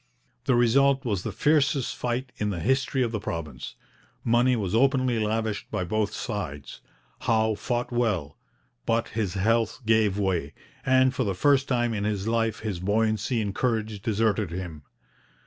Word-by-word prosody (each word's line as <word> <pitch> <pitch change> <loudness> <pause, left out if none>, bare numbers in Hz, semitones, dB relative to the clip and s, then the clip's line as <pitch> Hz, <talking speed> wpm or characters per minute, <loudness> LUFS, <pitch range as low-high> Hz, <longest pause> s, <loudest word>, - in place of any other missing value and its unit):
The 130 -3 +3
result 135 +3 +3
was 100 -6 0
the 110 - -4
fiercest 140 - +2
fight 125 +2 -2
in 105 - -1
the 95 -4 -3
history 130 - +1
of 115 - -1
the 110 - -2
province. 85 -6 -6 0.5
Money 120 +2 +3
was 100 -5 -2
openly 130 -1 +3
lavished 110 -1 -1
by - - -2
both 105 +3 0
sides. 90 - -5 0.4
Howe 110 -1 +2
fought 120 +4 -2
well, 105 -12 0 0.5
but 115 0 +1
his 105 -4 -2
health 115 +4 +1
gave 110 -3 +3
way, 90 -7 -1 0.3
and 130 0 +4
for 130 - 0
the 100 -4 -1
first 140 +7 +3
time 120 -2 +1
in 100 -2 -2
his 105 -1 -1
life 115 -1 0
his 105 -5 -3
buoyancy 110 +4 +1
and 100 -1 -3
courage 110 -3 -1
deserted 110 -3 +1
him. 85 -3 -6
110 Hz, 160 wpm, -26 LUFS, 100-120 Hz, 0.5 s, and